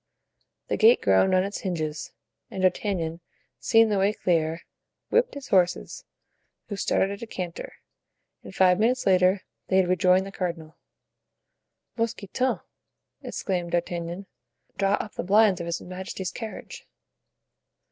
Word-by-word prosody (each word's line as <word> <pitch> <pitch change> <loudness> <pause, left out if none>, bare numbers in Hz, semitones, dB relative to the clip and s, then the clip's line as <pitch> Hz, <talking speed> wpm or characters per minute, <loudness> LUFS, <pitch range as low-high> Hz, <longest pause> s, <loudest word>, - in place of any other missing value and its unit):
The - - -1
gate 225 +3 +6
groaned 100 - +3
on 185 - +3
its 200 +1 -4
hinges, 155 -5 -4 0.4
and 190 - -5
D'Artagnan, 180 -3 0 0.4
seeing 225 -1 +4
the 205 -2 +1
way 200 +2 +2
clear, 165 -3 0 0.5
whipped 485 +1 +2
his 280 -2 -8
horses, 180 -2 +1 0.6
who 205 - -3
started 195 0 +1
at 200 - -7
a 230 - -6
canter, 180 -5 -6 0.7
and - - -12
five 185 0 +4
minutes 250 +4 +1
later 185 +1 +3 0.2
they 190 - +2
had 190 -1 +4
rejoined 185 +1 +3
the 195 - -8
cardinal. 170 -4 -5 1.2
"Mousqueton!" 230 +2 -1 0.6
exclaimed 175 -3 -3
D'Artagnan, 175 +2 -2 0.5
"draw 195 0 +1
up 210 - -6
the - - -4
blinds 200 0 +4
of 170 - -5
his 170 - -2
majesty's 185 0 -6
carriage." 225 -2 -8
185 Hz, 135 wpm, -26 LUFS, 175-205 Hz, 1.2 s, gate